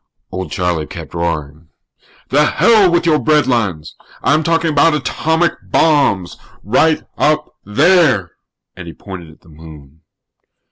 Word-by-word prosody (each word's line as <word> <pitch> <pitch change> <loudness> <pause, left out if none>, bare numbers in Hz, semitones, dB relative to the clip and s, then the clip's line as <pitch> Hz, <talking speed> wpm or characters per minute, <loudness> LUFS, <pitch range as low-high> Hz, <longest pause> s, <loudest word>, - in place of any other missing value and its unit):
Old 95 0 -5
Charlie 85 -4 -2
kept 85 -5 -10
roaring: 80 -2 -4 0.6
"The 145 +3 +3
hell 205 +2 +3
with 170 0 +1
your 155 -2 +3
breadlines! 115 - 0 0.3
I'm 150 +5 +2
talking 165 0 0
about 150 +2 +3
atomic 160 +2 0
bombs. 140 - +1 0.3
Right 150 +9 +1 0.2
up 150 0 0
there!" 135 - +2 0.4
And 95 -2 -10
he 85 - -8
pointed 90 -5 -10
at 80 - -19
the - - -21
Moon. 75 -1 -15
110 Hz, 130 wpm, -16 LUFS, -, 0.6 s, The